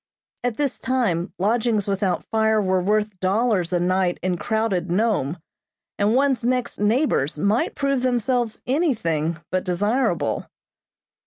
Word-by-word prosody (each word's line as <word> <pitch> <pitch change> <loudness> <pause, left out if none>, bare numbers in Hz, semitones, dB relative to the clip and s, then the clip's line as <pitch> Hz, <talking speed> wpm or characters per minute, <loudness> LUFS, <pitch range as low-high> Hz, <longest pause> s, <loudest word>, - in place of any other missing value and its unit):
At 245 -3 -1
this 285 -3 -1
time 230 -10 0
lodgings 215 +1 +1
without 195 -3 0
fire 220 -1 +2
were 185 -2 +1
worth 210 0 0
dollars 190 -1 +1
a 175 - +1
night 180 0 +1
in 185 -1 0
crowded 195 -2 -1
Nome, 180 - 0 0.6
and 205 +3 +2
one's 265 -3 +2
next 250 0 -1
neighbors 210 - +1
might 200 +8 +1
prove 275 -2 0
themselves 245 -2 0
anything 215 - 0
but 185 0 0
desirable. 195 - 0
210 Hz, 130 wpm, -23 LUFS, 185-245 Hz, 0.6 s, fire